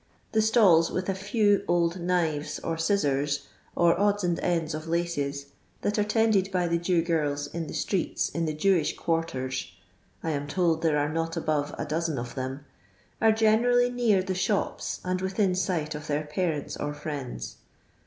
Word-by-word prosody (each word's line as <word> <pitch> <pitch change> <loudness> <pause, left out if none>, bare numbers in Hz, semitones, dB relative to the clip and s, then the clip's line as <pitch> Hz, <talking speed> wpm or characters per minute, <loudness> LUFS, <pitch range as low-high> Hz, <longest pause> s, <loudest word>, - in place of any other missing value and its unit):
The 220 - +3
stills, 205 -7 +5
with 185 +1 -2
a - - +2
few 205 +1 +2
old 175 +1 +1
knives 165 -4 0
or 165 - -3
scissors, 145 -5 0 0.3
or 170 0 +3
odds 205 0 +2
and 175 -1 0
ends 165 -3 0
of 155 +1 -5
laces, 145 -5 -2 0.3
that 210 +1 0
are - - +4
tended 210 -2 +2
by 180 -2 +1
the 170 0 +1
Jew 175 -1 +1
giris 150 -4 0
in 170 -2 -3
the - - -6
streeU 190 -4 -1
in 165 0 -1
the 155 - -1
Jewish 170 -1 +2
quarters 130 - -2 0.5
(I 165 - -1
am 145 -1 -2
told 165 0 +1
there 160 -3 +2
are 145 +1 0
not 165 0 -2
above 150 -2 -1
a - - -3
dozen 160 0 -1
of 120 0 -5
them) 130 +2 -5 0.6
ve 225 - +6
generally 240 +3 +3
near 230 -6 +2
the 190 - -2
shops 190 +3 -1
and 185 0 -1
within 190 0 +1
sight 175 -4 -1
of 150 +1 -7
their 150 +1 0
parents 150 -1 -2
or 145 0 -3
friends. 145 -4 -6
170 Hz, 175 wpm, -27 LUFS, 150-190 Hz, 0.6 s, ve